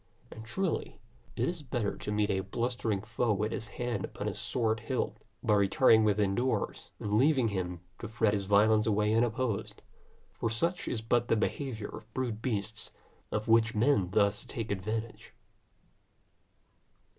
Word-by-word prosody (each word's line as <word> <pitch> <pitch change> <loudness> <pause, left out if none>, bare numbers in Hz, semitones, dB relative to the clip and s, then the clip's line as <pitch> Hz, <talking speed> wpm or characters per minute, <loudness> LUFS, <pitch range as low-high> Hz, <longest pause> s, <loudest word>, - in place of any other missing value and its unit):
And 110 - -9
truly, 165 +10 -2 0.4
it 125 +2 0
is 170 -2 -3
better 120 -6 -2
to - - -5
meet 105 0 +1
a 95 - +1
blustering 110 0 -2
foe 115 +1 0
with 105 +2 -1
his 110 - -4
hand 120 0 -3
upon - - -5
his - - -3
sword 115 -3 0
hilt, - - -2 0.3
by - - +3
retiring 110 +3 +5
within 105 -2 +2
doors, 125 +5 -1
and 105 +1 +1
leaving 135 -4 +4
him 90 -3 -3 0.2
to - - -5
fret 110 -1 +1
his 100 -2 -2
violence 105 +2 +4
away 105 0 +2
unopposed; 115 -1 0 0.5
for 115 - -2
such 170 +11 -1
is 115 - -2
but 120 +1 +1
the - - +3
behaviour 115 -1 -2
of 110 - -10
brute 120 -4 -2
beasts, 110 -3 -3 0.4
of 105 0 -2
which 115 0 +4
men 105 -5 +3
thus 100 +1 +2
take 115 -3 -5
advantage. 110 +3 -4
110 Hz, 155 wpm, -31 LUFS, 105-120 Hz, 0.5 s, retiring